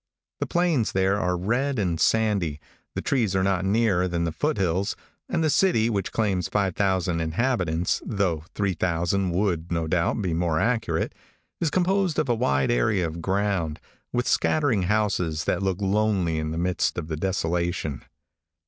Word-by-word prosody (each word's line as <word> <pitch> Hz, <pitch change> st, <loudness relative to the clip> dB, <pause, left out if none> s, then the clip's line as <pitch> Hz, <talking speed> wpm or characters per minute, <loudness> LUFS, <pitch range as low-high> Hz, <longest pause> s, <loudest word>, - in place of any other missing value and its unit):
The -, -, -2 dB
plains 170 Hz, -, +1 dB
there 95 Hz, +1 st, +2 dB
are 90 Hz, -2 st, 0 dB
red 120 Hz, +9 st, 0 dB
and 90 Hz, -6 st, 0 dB
sandy; 100 Hz, -10 st, +1 dB, 0.4 s
the -, -, -3 dB
trees 115 Hz, -9 st, +1 dB
are 95 Hz, -, +2 dB
not 95 Hz, -1 st, +1 dB
nearer 95 Hz, -2 st, +2 dB
than 85 Hz, -1 st, -1 dB
the 85 Hz, -, -1 dB
foot 150 Hz, -, -1 dB
hills; 95 Hz, +2 st, 0 dB, 0.3 s
and 170 Hz, -3 st, 0 dB
the 155 Hz, -, +2 dB
city, 120 Hz, -13 st, +3 dB
which 100 Hz, -3 st, -2 dB
claims 95 Hz, -6 st, 0 dB
5,000 95 Hz, -2 st, 0 dB
inhabitants, 85 Hz, -1 st, 0 dB
though 95 Hz, -8 st, -1 dB
3,000 90 Hz, -1 st, 0 dB
would, 85 Hz, -2 st, -1 dB
no 85 Hz, -1 st, 0 dB
doubt, 85 Hz, +6 st, 0 dB
be 90 Hz, -5 st, -1 dB
more 85 Hz, -1 st, +1 dB
accurate, 115 Hz, +3 st, 0 dB, 0.5 s
is 165 Hz, -, +1 dB
composed 185 Hz, 0 st, +1 dB
of -, -, 0 dB
a -, -, +4 dB
wide 70 Hz, -, +1 dB
area 85 Hz, -, +2 dB
of 80 Hz, +1 st, -5 dB
ground, 95 Hz, -5 st, -1 dB, 0.3 s
with 120 Hz, 0 st, -1 dB
scattering 130 Hz, -12 st, +2 dB
houses 95 Hz, -7 st, 0 dB
that 80 Hz, -, 0 dB
look 95 Hz, -1 st, -1 dB
lonely 100 Hz, -5 st, +1 dB
in 80 Hz, 0 st, -2 dB
the 80 Hz, -, -4 dB
midst 90 Hz, +1 st, 0 dB
of 85 Hz, -3 st, -3 dB
the 80 Hz, -, -3 dB
desolation. 85 Hz, -4 st, -1 dB
95 Hz, 165 wpm, -25 LUFS, 85-110 Hz, 0.5 s, a